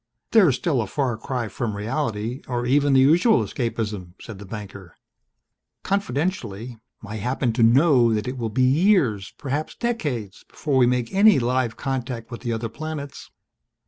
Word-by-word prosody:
"They're 200 -9 +6
still 130 0 0
a 110 - -4
far 130 0 -1
cry 120 +1 -4
from 110 0 -4
reality, 115 +1 -3
or 120 -1 -2
even 140 +2 +3
the 135 - +6
usual 170 - +4
escapism," 105 -7 -4
said 110 -4 -10
the 100 - -10
banker. 100 -4 -9 0.9
"Confidentially, 130 - -2 0.3
I 110 +2 -6
happen 125 +2 -1
to 120 - -1
know 125 0 +5
that 105 0 -1
it 125 - -3
will 115 -3 -3
be 125 +4 +1
years 135 - +2
perhaps 145 +3 -3
decades 145 - -3
before 145 -4 -1
we 125 -2 +5
make 125 -2 -1
any 205 +2 +6
live 125 -1 0
contact 125 -3 -4
with 120 - -7
the 120 - -3
other 115 0 -2
planets. 150 +2 -7
125 Hz, 160 wpm, -23 LUFS, 115-145 Hz, 0.9 s, They're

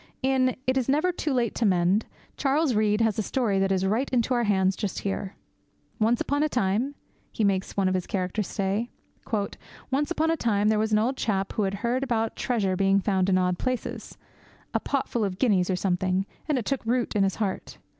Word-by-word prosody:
In 260 -1 +2
It 260 +1 +1
is 260 -1 0
Never 310 +6 +3
Too 315 -3 -2
Late 240 -4 +1
to - - -2
Mend, 185 +1 +2 0.3
Charles 285 0 +1
Reade 210 0 +2
has 225 -2 +1
a - - +3
story 215 -3 0
that 195 0 +1
is 190 0 +1
right 225 +8 0
into 250 0 +1
our 240 -1 +1
hands 190 -2 +2
just 205 -3 -3
here. 195 0 -3 0.6
'Once 225 +2 +3
upon 285 +1 0
a 305 - +2
time,' 245 +4 0 0.4
he 220 - -2
makes 195 -1 0
one 195 -1 +3
of 185 - +1
his 185 -1 -2
characters 185 +1 -2
say, 205 +4 -1 1.0
'once 290 +3 +1
upon 325 -1 +1
a - - +2
time 210 -4 +2
there 215 -1 +2
was 220 0 0
an 210 - +4
old 245 +5 +1
chap 195 -3 -1
who - - -1
had 195 - -5
heard 245 +2 +1
about 225 -4 -1
treasure 205 -7 0
being 195 +1 +3
found 190 -1 +1
in 185 - +4
odd 180 -1 +1
places, 255 -2 -4 0.6
a - - +2
pot 275 -2 -1
full 235 - -1
of 190 -3 -2
guineas 200 -7 +2
or 185 - +2
something; 185 +1 0 0.2
and 295 - +2
it 240 - -2
took 275 -2 -1
root 240 0 0
in 205 - +3
his 195 -1 +2
heart. 200 -4 -3
215 Hz, 215 wpm, -26 LUFS, 195-255 Hz, 1.0 s, an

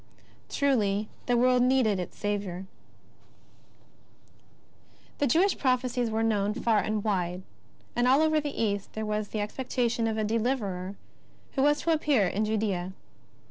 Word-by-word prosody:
Truly 215 -7 +1 0.2
the 245 -1 +3
world 250 +1 +4
needed 250 -6 +3
its 180 - -6
Saviour! 200 -3 -3 2.5
The 290 - +2
Jewish 360 +10 +3
prophecies 255 -2 +1
were 220 +1 0
known 210 -2 +1
far 230 -3 +2
and 210 +1 -1
wide, 180 -3 -1 0.5
and 240 +1 +2
all 270 +4 +5
over 310 -1 +3
the 295 - -3
East 200 -2 -2
there 220 0 -3
was 210 0 -2
the 215 - -3
expectation 235 +1 -1
of 220 -1 -1
a 215 - 0
Deliverer 210 -4 -1 0.6
who 270 - -1
was 295 +1 +3
to 335 - +1
appear 295 -9 +3
in 205 +4 0
Judea. 200 -4 -1
220 Hz, 140 wpm, -28 LUFS, 205-255 Hz, 2.5 s, all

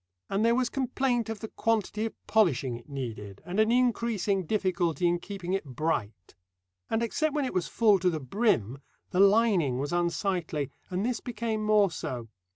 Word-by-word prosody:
And 200 +2 +1
there 230 +1 +4
was 255 -1 0
complaint 255 -3 0
of 225 -2 -5
the 220 - -4
quantity 220 -1 -1
of - - -10
polishing 140 - +2
it 120 +4 -12
needed, 110 -8 -6
and 185 +4 -3
an 220 +1 +4
increasing 230 -6 +1
difficulty 180 -4 +1
in 175 0 +1
keeping 190 -1 -5
it 195 - 0
bright. 125 - -3 0.6
And 225 - +1
except 300 +6 0
when 290 -2 +1
it 255 - -4
was 180 - 0
full 210 -4 +4
to 180 +1 +2
the 160 -3 -2
brim, 135 - 0 0.3
the 180 - 0
lining 195 - +4
was 145 +4 -3
unsightly; 175 -4 -1 0.2
and 185 +3 -1
this 245 -1 -1
became 220 -2 -3
more 210 -3 +4
so. 120 -7 -5
195 Hz, 175 wpm, -28 LUFS, 155-225 Hz, 0.6 s, there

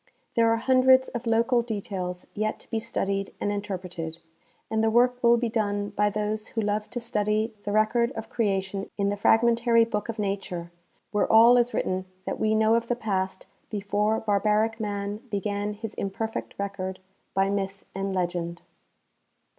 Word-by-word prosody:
There 230 -1 +4
are 230 - +3
hundreds 260 +2 +5
of 240 -1 -5
local 230 +2 +3
details 195 -5 -4
yet 215 +1 -1
to - - -17
be 225 - 0
studied 195 -3 -2
and 205 - 0
in 205 0 -1
terpreted, 180 -5 -5 0.5
and 220 0 0
the 225 - +4
work 245 +2 +3
will 235 0 +6
be 240 0 0
done 205 -2 -1
by 210 0 +1
those 210 +1 -2
who 225 - -2
love 210 0 -1
to 245 - -3
study 215 0 0
the 205 - -2
record 220 +3 +2
of 225 0 -6
creation 195 -3 -1
in 200 -1 +1
the 205 - 0
fragmentary 230 +2 +4
book 210 -1 -3
of 230 - -3
nature, 195 -4 -3 0.4
where 210 - +1
all 230 +2 +8
is 245 0 +3
written 185 0 -1 0.2
that - - -3
we 220 0 +2
know 220 0 +4
of 230 0 +1
the 245 - +1
past 190 -5 -2 0.2
before 210 +1 0
barbaric 215 +2 +1
man 205 -1 -3
began 205 0 -2
his 220 0 -6
imperfect 220 +3 -4
record 195 -2 -4 0.4
by 195 +1 +2
myth 195 -1 -3
and 195 +1 -2
legend. 175 -1 -2
210 Hz, 170 wpm, -26 LUFS, 200-230 Hz, 0.5 s, all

